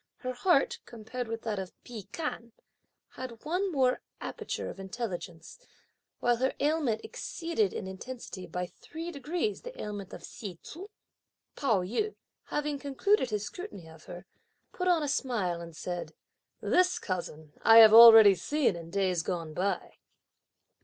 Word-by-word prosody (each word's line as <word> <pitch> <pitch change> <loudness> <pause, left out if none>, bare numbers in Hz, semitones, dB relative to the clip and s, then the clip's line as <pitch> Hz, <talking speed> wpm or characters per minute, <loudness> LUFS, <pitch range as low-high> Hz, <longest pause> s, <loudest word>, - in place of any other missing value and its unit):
Her 255 0 -4
heart, 275 +3 +2
compared 235 +2 -6
with 225 0 -5
that 215 -3 -2
of 190 -1 -6
Pi 225 -5 -8
Kan, 235 -8 -5 0.6
had 250 -2 -9
one 365 +5 0
more 260 -4 +2 0.2
aperture - - -5
of - - -8
intelligence; 190 - -6 0.6
while 240 -1 +2
her 260 +2 0
ailment 290 -7 +1
exceeded 390 -1 -2
(in - - -5
intensity) 190 0 -8
by 180 0 -3
three 325 - -8
degrees 345 - -2
the - - -10
ailment 205 -3 -6
of - - -9
Hsi 200 -5 -8
Tzu. 340 - -10 0.7
Pao 220 -10 +1
yü, 415 - -2 0.3
having 295 -1 -2
concluded 280 +3 +1
his 210 -1 -2
scrutiny 355 - -8
of 160 -1 -15
her, 175 0 -9 0.5
put 365 - -2
on 345 -4 +3
a - - -1
smile 220 -11 -1
and 170 -1 -10
said, 175 +1 -5 0.5
"This 365 0 +3
cousin 160 -5 -5
I 225 0 +7
have 220 -1 +10
already 225 -3 +11
seen 285 - 0
in 165 -1 -8
days 185 -2 0
gone 165 -2 -4
by." 185 +2 -2
230 Hz, 150 wpm, -30 LUFS, 185-295 Hz, 0.7 s, already